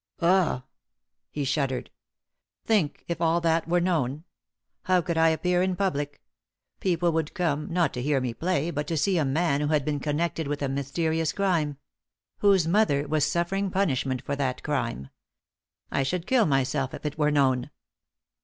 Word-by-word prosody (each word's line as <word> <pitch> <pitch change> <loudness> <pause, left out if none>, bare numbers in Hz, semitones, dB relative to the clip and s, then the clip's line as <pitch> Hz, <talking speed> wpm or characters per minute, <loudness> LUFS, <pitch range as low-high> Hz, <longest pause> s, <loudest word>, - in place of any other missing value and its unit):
Ugh!" 170 -7 +2 0.7
He 145 - -3
shuddered. 135 -2 -1 0.7
"Think, 195 -10 +1
if 170 -1 -3
all 165 +1 +3
that 165 -1 +1
were 175 +1 +2
known! 155 -5 0 0.6
How 185 -1 +4
could 170 -1 -2
I 165 0 +5
appear 180 +2 +1
in 185 0 +1
public? 145 -7 -2 0.6
People 175 -2 +1
would 160 +1 -2
come, 165 -4 -1
not 170 -4 +1
to 125 - -3
hear 140 +1 +1
me 125 -2 -2
play, 170 +2 -1
but 150 -2 -3
to 165 - -1
see 185 +3 +2
a - - +2
man 145 +1 +1
who 150 - 0
had 150 -2 +1
been 150 -1 -1
connected 160 +2 -1
with 145 0 -3
a - - +1
mysterious 160 +4 -1
crime 165 -8 0 0.6
whose 195 -5 +4
mother 165 -7 +2
was 150 0 +1
suffering 195 +3 0
punishment 135 -9 0
for 140 - -2
that 135 -3 -2
crime! 70 - -2 0.8
I - - +1
should 170 +6 -2
kill 255 -6 +3
myself 135 -1 0
if - - -11
it 150 +1 -4
were 150 0 +3
known." 130 -4 +2
155 Hz, 170 wpm, -26 LUFS, 140-175 Hz, 0.8 s, I